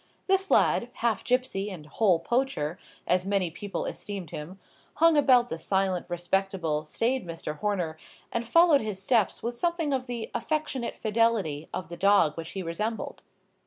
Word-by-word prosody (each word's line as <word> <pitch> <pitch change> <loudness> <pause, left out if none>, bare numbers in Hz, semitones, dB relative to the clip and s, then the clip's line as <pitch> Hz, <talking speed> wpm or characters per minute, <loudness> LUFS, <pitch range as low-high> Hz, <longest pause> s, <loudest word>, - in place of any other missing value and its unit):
This 385 0 +2
lad, 235 - +3
half 230 -3 0
gipsy 250 -6 0
and 175 -6 -8
whole 185 +3 +2
poacher, 185 - -1 0.3
as 180 0 +2
many 195 -3 0
people 200 +4 -4
esteemed 195 -6 -5
him, 175 +6 -7 0.4
hung 330 0 +5
about 255 -4 +5
the 160 - -4
silent, 190 0 0
respectable, 175 -3 -1
staid 235 +11 0
Mr. 165 -3 -6
Horner, 180 -7 -1 0.3
and 235 0 -2
followed 335 +1 +5
his 210 -3 -4
steps 215 +1 +1
with 240 +1 -2
something 335 +1 0
of 260 -1 -2
the 235 -2 -5
affectionate 300 -6 -2
fidelity 215 -9 0
of 180 -4 -5
the 170 - -7
dog 195 -6 +4
which 165 -1 -6
he 190 - -4
resembled. 210 +7 -3
200 Hz, 160 wpm, -27 LUFS, 175-245 Hz, 0.4 s, hung